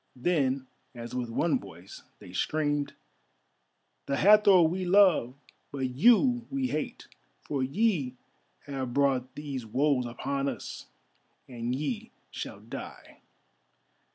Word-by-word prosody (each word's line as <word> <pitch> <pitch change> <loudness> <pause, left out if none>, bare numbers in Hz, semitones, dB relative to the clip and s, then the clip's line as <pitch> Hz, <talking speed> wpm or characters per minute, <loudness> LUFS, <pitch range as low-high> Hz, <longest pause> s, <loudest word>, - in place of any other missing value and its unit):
Then 135 -2 0 0.3
as 120 0 -8
with 125 -2 -3
one 140 +4 +1
voice 85 +4 -12 0.2
they 90 - -13
screamed: 145 +6 -1 1.1
"The 140 0 0
Hathor 205 -3 +7
we 175 +4 0
love, 180 -9 +4 0.4
but 130 -2 -2
you 240 - +4
we 270 -2 -1
hate, 155 - -4 0.4
for 140 -2 -2
ye 140 - 0 0.5
have 130 -3 -5
brought 130 -2 +1
these 140 -4 -5
woes 130 +2 +1
upon 140 +3 -2
us, - - -7 0.6
and 120 -1 -3
ye 215 - -4 0.2
shall - - -7
die." - - -10
140 Hz, 115 wpm, -29 LUFS, 125-180 Hz, 1.1 s, Hathor